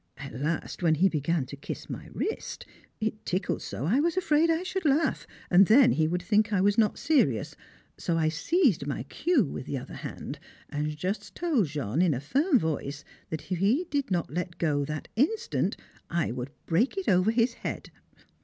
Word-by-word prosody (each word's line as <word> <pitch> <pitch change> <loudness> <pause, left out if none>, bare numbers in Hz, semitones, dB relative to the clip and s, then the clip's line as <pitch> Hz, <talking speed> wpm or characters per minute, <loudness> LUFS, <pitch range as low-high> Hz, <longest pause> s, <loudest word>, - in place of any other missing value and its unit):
At 140 -2 -8
last, 150 +10 -3
when 165 -2 +4
he 190 +5 +4
began 155 -1 0
to 135 - -8
kiss 140 - -7
my - - -7
wrist, 440 - -4 0.3
it 215 0 -3
tickled 185 +2 -1
so - - -5
I 220 - +3
was 335 +3 +1
afraid 330 -2 +3
I 330 +2 +1
should 370 0 -3
laugh, 305 +1 +1 0.2
and 185 +1 +7
then 250 +2 +7
he 155 -1 +2
would 175 +2 -2
think 215 +2 +2
I 200 - +2
was 200 +2 +3
not 215 -2 +2
serious; 245 - +1 0.4
so 165 - 0
I 160 -1 +2
seized 185 - +2
my 140 -4 -2
cue 285 - +1
with 135 - -6
the 140 - -2
other 125 - -8
hand, - - -7 0.3
and 150 +1 -2
just 185 +6 -3
told 300 - +1
Jean 145 -1 -1
in 175 -6 +3
a - - -2
firm 275 - +2
voice 145 - -2 0.3
that 160 +3 -6
if 180 - 0
he 235 - +2
did 280 -5 0
not 175 -5 -1
let 175 0 -3
go 145 -4 +1
that 155 +1 -5
instant 305 - 0 0.3
I 170 -6 0
would 125 +2 -4 0.2
break 225 - +1
it 390 - -3
over 185 +2 +4
his 230 +1 +2
head! - - -5
185 Hz, 195 wpm, -28 LUFS, -, 0.4 s, and